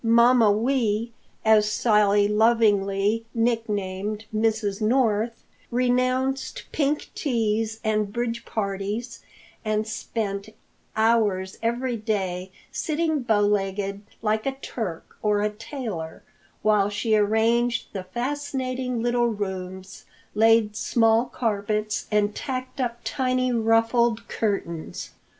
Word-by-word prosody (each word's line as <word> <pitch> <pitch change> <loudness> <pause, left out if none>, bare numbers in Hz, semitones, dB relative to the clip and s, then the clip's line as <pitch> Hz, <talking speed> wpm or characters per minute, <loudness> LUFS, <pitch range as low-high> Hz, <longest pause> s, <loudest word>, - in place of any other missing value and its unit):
Mamma 235 -1 +5
Wee, 230 0 +1 0.3
as 215 -1 +5
Sally 210 -2 +3
lovingly 210 -1 +2
nicknamed 210 -3 -1
Mrs. 215 -2 0
North, 225 -1 +1 0.3
renounced 255 +2 0
pink 295 0 0
teas 220 -4 0
and 215 -2 0
bridge 235 0 -2
parties 205 +3 -3 0.4
and 215 0 0
spent 215 -2 -3 0.5
hours 215 -4 +2
every 240 +2 -1
day 190 -4 -2 0.2
sitting 315 -1 0
bow 220 -4 +2
legged 200 -1 0 0.2
like 215 +2 0
a 270 - 0
Turk 190 -9 -5
or 210 -1 +2
a 210 - +1
tailor, 215 - -6 0.4
while 210 -2 +3
she 210 +2 +1
arranged 225 +3 +2
the 190 -2 -5
fascinating 255 +1 -3
little 240 0 +2
rooms, 190 -3 -5 0.3
laid 220 0 +4
small 225 +1 +3
carpets 215 -2 -2
and 210 -1 +2
tacked 255 +1 -4
up 235 -2 -1
tiny, 255 -1 0
ruffled 230 0 +2
curtains. 180 -7 -3
220 Hz, 105 wpm, -25 LUFS, 205-240 Hz, 0.5 s, Mamma